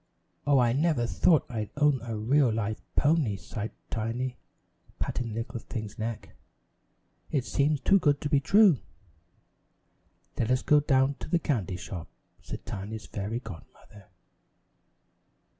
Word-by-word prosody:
"Oh, 145 -1 +5
I 120 -2 +4
never 145 -3 +2
thought 160 +6 +3
I'd 110 -5 -4
own 145 -3 +3
a 115 -2 -4
real 125 +4 +3
live 110 -1 -2
pony," 145 -9 +2
sighed 110 +2 -5 0.2
Tiny, 120 +3 -2 0.6
patting 125 - -2
the 110 - -6
little 115 +1 -4
thing's 110 -3 -7
neck. 110 0 -5 0.9
"It 135 -5 0
seems 145 0 +1
too 195 - +5
good 145 -5 +2
to - - -1
be 145 -1 +3
true." 195 - +5 1.6
"Let 115 - +1
us 130 0 +2
go 150 - +5
down 135 -1 +2
to - - -6
the 175 - +3
candy 110 - -1
shop," 90 -2 -7 0.3
said - - -8
Tiny's 105 +2 -6
fairy 105 +4 -4
godmother. 100 -1 -12
125 Hz, 140 wpm, -28 LUFS, 110-145 Hz, 1.6 s, Oh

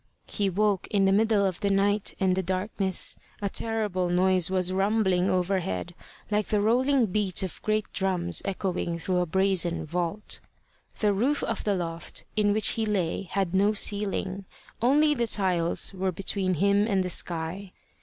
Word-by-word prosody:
He 200 -1 -1
woke 200 0 0
in 200 -3 +2
the 195 - +3
middle 210 0 +3
of 185 -2 -2
the 200 - 0
night 200 +1 +1
and 185 -1 +2
the 190 - 0
darkness. 190 +1 0 0.2
A 200 - -2
terrible 210 -5 -1
noise 185 -1 +3
was 185 -1 0
rumbling 195 -2 +1
overhead, 180 - -1 0.4
like 210 0 0
the 210 - +1
rolling 250 +4 +2
beat 195 -2 0
of 185 - -6
great 215 0 0
drums 180 -3 0
echoing 185 -3 -2
through 180 +2 -1
a 180 - 0
brazen 190 -1 +1
vault. 175 +5 -3 0.6
The 210 -2 +3
roof 260 +9 0
of 225 - -3
the 205 -2 +1
loft 170 -2 -5
in 210 -1 +2
which 215 0 +3
he 225 - -1
lay 195 -2 -1
had 190 -3 -1
no 200 +3 +3
ceiling; 200 -2 0 0.4
only 295 +5 +4
the 240 -4 -1
tiles 180 -4 +1
were 190 0 -1
between 190 0 -1
him 200 +4 +2
and 195 -4 +1
the 180 - -3
sky. 175 +3 -1
195 Hz, 165 wpm, -26 LUFS, 180-210 Hz, 0.6 s, only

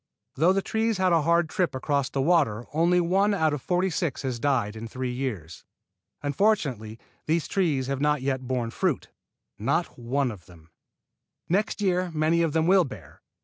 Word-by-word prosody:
Though 165 +6 +3
the 195 0 0
trees 225 -1 0
had 185 -1 +2
a 165 - +4
hard 170 +2 +2
trip 175 -1 -1
across 140 0 0
the 135 - -1
water 135 -9 +2
only 170 +3 +3
one 195 +4 +2
out 160 -5 +1
of 145 - -3
forty 180 +4 0
six 160 -5 -2
has 130 -3 -3
died 120 -6 0
in 110 +1 -6
three 125 +2 -4
years. 105 - -5 0.6
Unfortunately 145 - 0 0.3
these 160 +1 +1
trees 155 -9 0
have 135 +1 -3
not 150 -2 +1
yet 130 -2 -2
borne 120 -3 -2
fruit, - - -1 0.5
not - - -1
one 125 +2 0
of 95 -6 -12
them. 80 -2 -18 0.8
Next 205 +4 0
year 185 -2 +1
many 155 +2 +2
of 165 -2 +1
them 160 0 +2
will 185 +1 +5
bear. 135 - -11
150 Hz, 180 wpm, -26 LUFS, 130-175 Hz, 0.8 s, will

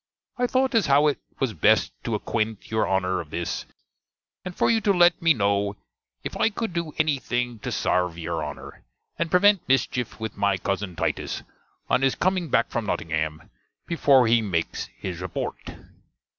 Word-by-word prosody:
I 245 0 +1
thote 260 +1 +1
as 225 -7 +3
how 140 +1 +5
it 150 - +1 0.2
was 130 -5 0
best 80 - +3
to - - 0
acquent 110 -1 -3
you 110 0 +2
Honner 95 -1 0
of 80 - -12
this; 85 +2 -4 0.8
and 180 -1 -7
for - - +3
you 225 -1 +2
to 205 - +3
let 175 -2 +4
me 165 0 +5
kno' 100 -1 +1 0.5
if - - -5
I - - +3
could 225 -3 -4
do 170 -3 -3
any 155 -3 +2
think 120 -3 -3
to - - -4
sarve 90 -2 0
your 80 - -3
Honner, - - -8 0.4
and 170 -1 0
prevent 195 0 +4
mischief 125 -3 0
with 110 0 -5
my 100 -1 +1
cuzzen 95 0 -3
Titus, - - -2 0.4
on - - +2
his 135 -1 +2
coming 185 -3 0
back 115 - +2
from 115 -3 -2
Nottingam, 80 -3 -3 0.3
before 140 -6 +4
he 115 0 +4
mackes 90 -6 -2
his 90 -2 -5
reporte. 90 -2 -5
120 Hz, 175 wpm, -25 LUFS, -, 0.8 s, how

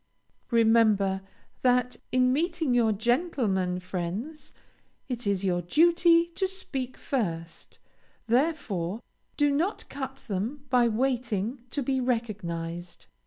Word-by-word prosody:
Remember 220 -4 +4 0.4
that 250 0 +2
in 255 0 +3
meeting 325 -2 0
your 235 -2 +4
gentlemen 215 - 0
friends 185 - -5 0.6
it 245 -4 -4
is 200 -1 +1
your 180 -2 +1
duty 335 - +4
to 360 +3 -2
speak 275 -10 -5
first, 170 -10 -4 0.5
therefore 230 - 0 0.3
do 290 -1 +3
not 335 +9 -1
cut 270 -1 -6
them 230 +8 -3
by 245 -2 +5
waiting 235 -1 -1
to 280 +3 -2
be 265 +1 0
recognized. 175 -8 -3
240 Hz, 110 wpm, -27 LUFS, 195-280 Hz, 0.6 s, by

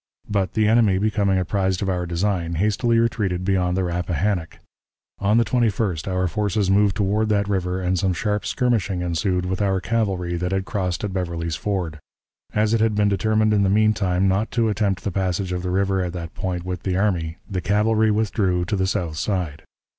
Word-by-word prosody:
But, 100 -3 -1
the 110 -1 +2
enemy 110 -4 +4
becoming 100 -1 +1
apprised 95 +1 0
of - - -2
our 90 -2 -1
design, 85 -1 -1
hastily 105 +6 +1
retreated 100 -6 0
beyond 90 -2 +1
the 95 - +1
Rappahannock. 90 0 -1 0.6
On 105 +3 +2
the 115 - +4
21st 105 - 0
our 90 -1 0
forces 105 0 0
moved 100 0 +3
toward 105 +1 +1
that 100 -1 +1
river, 95 -2 -1
and 90 0 0
some 95 +1 +1
sharp 105 +3 -1
skirmishing 105 -8 0
ensued 90 +1 0
with 95 +2 -2
our 95 -2 +1
cavalry 95 -5 -1
that 90 +1 -2
had 95 0 -1
crossed 90 -3 -2
at 100 -2 -3
Beverly's 85 -3 -2
Ford. 85 -4 -3 0.5
As 105 +1 +1
it 115 - +2
had 110 -1 +2
been 105 0 +3
determined 110 +1 +2
in 105 - +3
the 100 - +2
mean 110 +2 +4
time 95 -2 +1
not 95 +4 +1
to 115 -2 +2
attempt 100 -2 0
the 100 - -2
passage 95 0 -1
of 90 -1 -2
the 90 - -3
river 95 0 +1
at 90 -1 -4
that 85 -2 -6
point 90 -2 -3
with 90 -1 -4
the 95 -1 -1
army, 85 -5 0
the 95 -2 -3
cavalry 110 +4 +2
withdrew 100 -4 +1
to 105 - -1
the 95 -1 0
south 90 -6 -2
side. 85 -4 -2
95 Hz, 200 wpm, -22 LUFS, 90-105 Hz, 0.6 s, enemy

